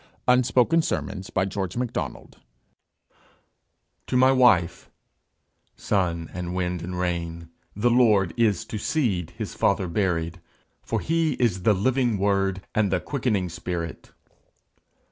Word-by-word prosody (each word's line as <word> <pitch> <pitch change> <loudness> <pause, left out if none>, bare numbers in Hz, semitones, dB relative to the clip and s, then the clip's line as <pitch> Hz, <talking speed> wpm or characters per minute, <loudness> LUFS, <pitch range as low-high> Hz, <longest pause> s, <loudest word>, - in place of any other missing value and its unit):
UNSPOKEN 125 +5 +4
SERMONS 95 -10 -3
SERIES 95 -1 -1
THREE 125 +1 0 2.2
TO 125 - +1
MY 130 +1 +6
WIFE 95 -11 +3 0.9
Sun 85 -5 -1
and 90 0 -4
wind 90 -1 -2
and 90 +2 -5
rain, 85 -2 -3 0.3
the 115 +4 +2
Lord 105 -7 +4
Is 110 -6 +1
to 110 - -5
seed 100 - -1
his 110 -3 -5
Father 100 -2 +1
buried 85 -2 -1 0.4
For - - -2
he 165 -1 +1
is 115 -7 0
the 105 +3 +3
living 120 +2 +1
Word, 95 -1 0
And 105 -3 +1
the 95 - +2
quickening 115 -9 -1
Spirit. 85 -1 -5
95 Hz, 120 wpm, -25 LUFS, 90-120 Hz, 2.2 s, MY